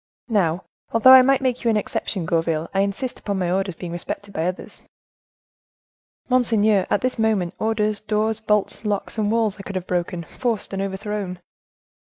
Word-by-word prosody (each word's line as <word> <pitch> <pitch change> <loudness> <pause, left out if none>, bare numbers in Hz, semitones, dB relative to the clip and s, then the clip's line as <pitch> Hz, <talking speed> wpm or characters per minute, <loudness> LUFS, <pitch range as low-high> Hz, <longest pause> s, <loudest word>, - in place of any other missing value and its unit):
Now, 185 -5 +1 0.3
although 230 +3 +7
I 260 - +11
might 270 +1 +3
make 255 -1 0
you 235 - +2
an 220 - +3
exception, 195 -3 -3
Gourville, 165 -1 0
I 195 - +1
insist 200 +6 -2
upon 200 -2 -3
my 180 -2 0
orders 190 -1 -1
being 175 0 -7
respected 200 +3 -6
by 160 0 -1
others." 185 +1 -6 1.5
"Monseigneur, 220 -6 +3
at 205 - +1
this 255 -2 -1
moment, 210 -6 +1
orders, 215 -1 0
doors, 215 0 -1
bolts, 210 -1 0
locks, 210 +1 -2
and 210 -1 +1
walls 225 -3 +1
I - - -5
could 195 0 -7
have 185 -1 -3
broken, 175 -1 -2
forced 230 +3 -3
and 195 - -2
overthrown!" 195 -1 -4
205 Hz, 175 wpm, -22 LUFS, 185-220 Hz, 1.5 s, I